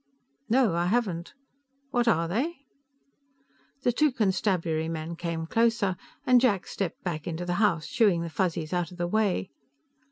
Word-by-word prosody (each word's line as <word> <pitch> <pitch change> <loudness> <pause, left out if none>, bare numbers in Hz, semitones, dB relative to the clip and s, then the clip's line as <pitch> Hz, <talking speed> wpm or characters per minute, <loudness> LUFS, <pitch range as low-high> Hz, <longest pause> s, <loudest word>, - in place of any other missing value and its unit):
"No, 235 -5 +4
I 170 +1 +1
haven't. 185 -6 -1 0.6
What 240 -1 +1
are 170 -7 +3
they?" 280 - -2 1.2
The 245 - +3
two 300 +4 +3
Constabulary 185 -8 0
men 165 +1 -4
came 165 -1 -3
closer, 225 -1 +2 0.3
and 250 -1 +6
Jack 205 -8 +2
stepped 190 -5 -4
back 160 -4 -3
into 170 +1 -3
the 175 - -1
house, 170 -7 +2
shooing 180 -1 +2
the 170 - -4
Fuzzies 165 -2 -1
out 175 -1 0
of 180 - -11
the 175 - -1
way. 195 0 0
180 Hz, 155 wpm, -27 LUFS, 170-225 Hz, 1.2 s, and